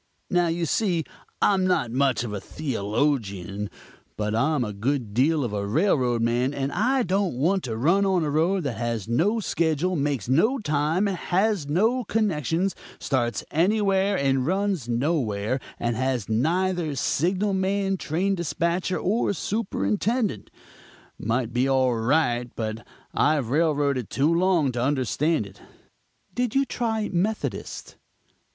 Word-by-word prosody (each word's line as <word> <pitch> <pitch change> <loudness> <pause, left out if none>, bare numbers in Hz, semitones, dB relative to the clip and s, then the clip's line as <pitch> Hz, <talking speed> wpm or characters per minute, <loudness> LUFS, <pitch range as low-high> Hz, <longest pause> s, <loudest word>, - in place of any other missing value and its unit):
Now, 175 -2 +3
you 165 +1 -1
see, 175 -1 +1 0.4
I'm 190 -2 +3
not 150 -10 +1
much 130 -3 +1
of 110 -4 -5
a 100 - -4
theologian, 105 - -2 0.5
but 105 0 -1
I'm 140 +4 +1
a 105 -3 -4
good 115 +1 -2
deal 145 +6 +2
of 115 -4 -3
a 100 -1 -2
railroad 125 - +2
man, 120 +4 +1
and 135 0 -2
I 250 - +1
don't 190 - 0
want 175 +9 +1
to 115 -3 -3
run 170 - +3
on 190 -3 +2
a 150 - -1
road 170 +5 +1
that 130 -6 -3
has 115 -3 -2
no 175 - +1
schedule, 170 -2 0
makes 140 - -1
no 190 - +3
time, 155 - 0
has 190 -2 0
no 225 - +2
connections, 190 - 0 0.3
starts 120 -4 -1
anywhere 195 +2 +2
and 135 -3 +1
runs 190 - 0
nowhere, 120 -3 0 0.2
and 120 -1 -1
has 130 -3 -1
neither 165 +6 0
signal 185 +9 0
man, 195 +1 0
train 185 +3 -1
dispatcher 175 +1 -1
or 205 +2 0
superintendent. 205 - -1 0.7
Might 115 +1 -1
be 125 +2 +2
all 130 -2 +3
right, 120 0 +1
but 110 0 -4 0.3
I've 145 -6 +1
railroaded 145 - +1
too 150 +5 +2
long 170 -5 +2
to 120 -1 -3
understand 140 +1 +1
it." 100 0 -14 0.7
"Did 245 -1 -1
you 275 0 +3
try 220 -4 -1
the - - -7
Methodist?" 210 +5 -3
150 Hz, 145 wpm, -25 LUFS, 120-190 Hz, 0.7 s, Now